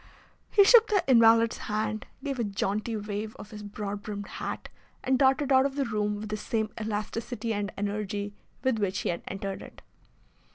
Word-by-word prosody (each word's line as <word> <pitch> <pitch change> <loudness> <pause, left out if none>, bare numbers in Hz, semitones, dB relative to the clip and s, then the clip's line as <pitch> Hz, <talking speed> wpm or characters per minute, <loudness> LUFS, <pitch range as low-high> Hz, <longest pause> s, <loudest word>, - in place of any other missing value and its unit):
He 405 - +6
shook 450 +2 +7
the 410 -3 +2
invalid's 230 -2 +6
hand, 215 +1 -2 0.2
gave 275 -3 -3
a - - +2
jaunty 210 +2 -1
wave 210 +1 -4
of 210 - -11
his 210 -1 -8
broad 205 0 -5
brimmed 205 -1 -5 0.2
hat, - - -4 0.4
and 260 0 +2
darted 270 +1 +3
out 265 +1 +6
of 275 - -9
the 280 -1 0
room 210 -2 -1
with 210 +1 -6
the 215 - -2
same 220 0 -2
elasticity 220 +2 -3
and 205 -1 -2
energy 205 0 -2 0.3
with 260 -4 +2
which 200 -1 0
he - - -1
had 170 - -2
entered 195 0 -4
it. - - -12
215 Hz, 180 wpm, -28 LUFS, 205-245 Hz, 0.4 s, shook